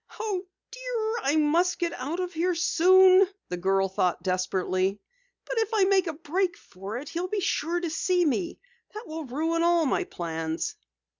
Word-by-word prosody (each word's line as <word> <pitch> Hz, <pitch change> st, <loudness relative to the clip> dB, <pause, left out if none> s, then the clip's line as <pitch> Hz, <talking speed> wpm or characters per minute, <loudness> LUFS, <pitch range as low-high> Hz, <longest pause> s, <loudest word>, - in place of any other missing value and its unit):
"Oh, 395 Hz, -4 st, -3 dB, 0.2 s
dear, 475 Hz, -2 st, -3 dB
I 275 Hz, +3 st, +1 dB
must 325 Hz, +4 st, +2 dB
get 340 Hz, -1 st, -1 dB
out 290 Hz, +8 st, -4 dB
of 360 Hz, 0 st, -3 dB
here 345 Hz, +2 st, 0 dB
soon!" 370 Hz, +2 st, +6 dB, 0.2 s
the 180 Hz, -, -3 dB
girl 195 Hz, +2 st, +1 dB
thought 180 Hz, -2 st, -1 dB
desperately. 185 Hz, +1 st, 0 dB, 0.5 s
"But -, -, -2 dB
if 445 Hz, -2 st, 0 dB
I 410 Hz, -, +4 dB
make 380 Hz, -1 st, +3 dB
a 325 Hz, -, -2 dB
break 340 Hz, +4 st, -1 dB
for 195 Hz, +4 st, -8 dB
it 275 Hz, +4 st, -7 dB
he'll 350 Hz, +2 st, -3 dB
be 415 Hz, +2 st, -2 dB
sure 350 Hz, -2 st, -1 dB
to 345 Hz, -1 st, -3 dB
see 355 Hz, +2 st, +1 dB
me. 335 Hz, +4 st, -1 dB, 0.4 s
That 430 Hz, +2 st, -7 dB
will 315 Hz, 0 st, -6 dB
ruin 320 Hz, +6 st, -1 dB
all 340 Hz, -1 st, +3 dB
my 265 Hz, -, 0 dB
plans." 165 Hz, -1 st, -4 dB
335 Hz, 175 wpm, -27 LUFS, 225-370 Hz, 0.5 s, soon